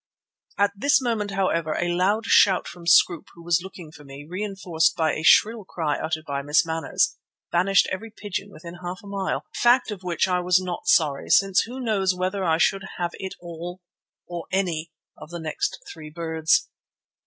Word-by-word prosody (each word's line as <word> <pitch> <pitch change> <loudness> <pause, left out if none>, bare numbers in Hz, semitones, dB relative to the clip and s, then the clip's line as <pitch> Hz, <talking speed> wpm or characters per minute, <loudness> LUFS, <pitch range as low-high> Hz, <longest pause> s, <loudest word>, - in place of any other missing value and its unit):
At 200 0 +3
this 280 +9 +3
moment, 230 -5 -1
however, 170 -5 0
a 175 0 0
loud 200 +5 +1
shout 195 -4 +4
from 175 -1 -10
Scroope, 170 -1 +4
who 170 - -14
was 170 0 +2
looking 180 -4 -10
for 150 -2 -14
me, 140 +1 -11
reinforced 185 -3 -1
by 160 -2 +1
a - - -3
shrill 215 +7 +4
cry 160 -5 -2
uttered 155 -1 -3
by 140 -1 -3
Miss 145 +4 +2
Manners, 160 0 0 0.3
banished 190 +3 +3
every 220 +5 -5
pigeon 205 -2 -6
within 170 0 -11
half 180 +1 -5
a - - -12
mile, 200 -1 -2
a - - -10
fact 240 -1 +4
of 200 -3 -6
which 180 0 0
I 180 -1 +1
was 180 +1 +3
not 180 -2 -5
sorry, 145 -4 +2
since 195 -1 +4
who 250 +3 -7
knows 200 -6 0
whether 185 +2 -2
I 160 -3 +2
should 195 +4 +2
have 175 -1 -2
hit 190 0 -6
all, 175 +1 -8 0.5
or 175 -1 -6
any, 170 -4 -1 0.2
of - - -12
the 175 0 -6
next 155 -2 -3
three 155 -2 -10
birds? 160 0 +1
180 Hz, 190 wpm, -24 LUFS, 160-195 Hz, 0.5 s, shout